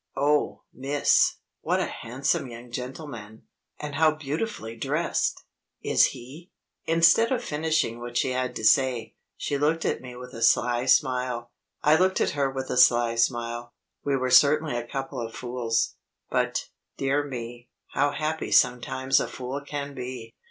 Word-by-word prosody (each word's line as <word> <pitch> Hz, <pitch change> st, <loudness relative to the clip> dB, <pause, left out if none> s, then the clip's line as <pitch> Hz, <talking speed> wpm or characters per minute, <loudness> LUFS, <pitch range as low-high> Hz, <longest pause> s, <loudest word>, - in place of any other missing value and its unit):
"Oh, 145 Hz, +2 st, +1 dB
miss, 140 Hz, +2 st, +2 dB, 0.3 s
what -, -, 0 dB
a -, -, +1 dB
handsome 130 Hz, +3 st, -2 dB
young 120 Hz, +1 st, -11 dB
gentleman, 125 Hz, -4 st, -7 dB, 0.4 s
and 150 Hz, -1 st, -5 dB
how 155 Hz, +1 st, +3 dB
beautifully 150 Hz, -, -4 dB
dressed! -, -, -1 dB, 0.4 s
Is -, -, +4 dB
he 140 Hz, +9 st, -8 dB, 0.2 s
?" -, -, -55 dB
Instead 170 Hz, +8 st, +5 dB
of 250 Hz, -2 st, 0 dB
finishing 155 Hz, -, -1 dB
what 120 Hz, 0 st, -5 dB
she 130 Hz, -, +1 dB
had 125 Hz, -1 st, -2 dB
to -, -, -5 dB
say, 115 Hz, -1 st, +3 dB, 0.2 s
she 140 Hz, -1 st, -2 dB
looked 160 Hz, +3 st, +1 dB
at -, -, 0 dB
me 125 Hz, -1 st, -9 dB
with 125 Hz, 0 st, -10 dB
a 115 Hz, -, -8 dB
sly 120 Hz, +2 st, +3 dB
smile. 125 Hz, -2 st, +1 dB, 0.3 s
I 150 Hz, +2 st, +5 dB
looked 185 Hz, +2 st, +2 dB
at -, -, +1 dB
her 140 Hz, -2 st, 0 dB
with 135 Hz, 0 st, -5 dB
a -, -, -1 dB
sly 120 Hz, -2 st, +5 dB
smile. 120 Hz, +1 st, -1 dB, 0.3 s
We 140 Hz, -1 st, +1 dB
were 130 Hz, 0 st, -1 dB
certainly 150 Hz, +1 st, +5 dB
a 120 Hz, 0 st, -3 dB
couple 135 Hz, -1 st, -4 dB
of 115 Hz, 0 st, -6 dB
fools. 120 Hz, -2 st, -1 dB, 0.4 s
But, -, -, 0 dB, 0.3 s
dear 140 Hz, +2 st, +1 dB
me, 120 Hz, -3 st, -7 dB, 0.2 s
how 145 Hz, +1 st, +1 dB
happy 155 Hz, +2 st, -3 dB
sometimes 130 Hz, +2 st, +3 dB
a -, -, -1 dB
fool 130 Hz, +2 st, -5 dB
can 140 Hz, -1 st, -5 dB
be! 125 Hz, -3 st, -7 dB
130 Hz, 160 wpm, -26 LUFS, 120-145 Hz, 0.4 s, Instead